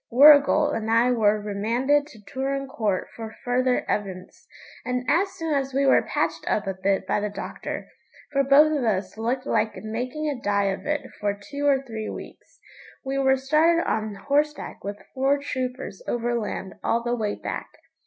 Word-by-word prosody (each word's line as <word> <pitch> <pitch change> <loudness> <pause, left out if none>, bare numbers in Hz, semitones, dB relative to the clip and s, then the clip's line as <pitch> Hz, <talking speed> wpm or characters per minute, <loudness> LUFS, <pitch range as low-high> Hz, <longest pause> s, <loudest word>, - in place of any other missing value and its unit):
Warrigal 290 +3 +7
and 220 -5 -2
I 230 +2 +4
were 215 -3 +3
remanded 235 +8 +1
to 235 - -15
Turon 270 +5 -3
Court 215 -9 -1
for 220 -1 -7
further 250 +1 +1
evidence, 190 -3 -4 0.4
and 250 0 -2
as 370 +7 +2
soon 325 -2 -3
as 270 -2 -1
we 275 0 +3
were 265 - +5
patched 165 -7 -2
up 210 - 0
a 195 - -2
bit 190 +1 0
by 195 - +1
the 210 0 -2
doctor 205 - -6 0.4
for 275 -1 +2
both 295 +3 +6
of 280 - -1
us 190 -4 -1
looked 240 +4 -2
like 220 - 0
making 250 +8 -3
a 280 -5 -3
die 200 -2 +1
of 190 - -8
it 295 -1 -2
for 205 -1 0
two 280 +9 -4
or 275 -1 +3
three 220 -3 -5
weeks - - -10 0.5
we 270 +1 -1
were 265 0 +4
started 310 +5 +3
on 215 -1 -1
horseback 290 +7 -1
with 200 +1 -4 0.2
four 270 +2 +2
troopers 260 - -4
overland 235 -5 -2
all 235 0 +1
the 240 0 0
way 210 -3 -2
back. - - -5
250 Hz, 175 wpm, -25 LUFS, 210-280 Hz, 0.5 s, Warrigal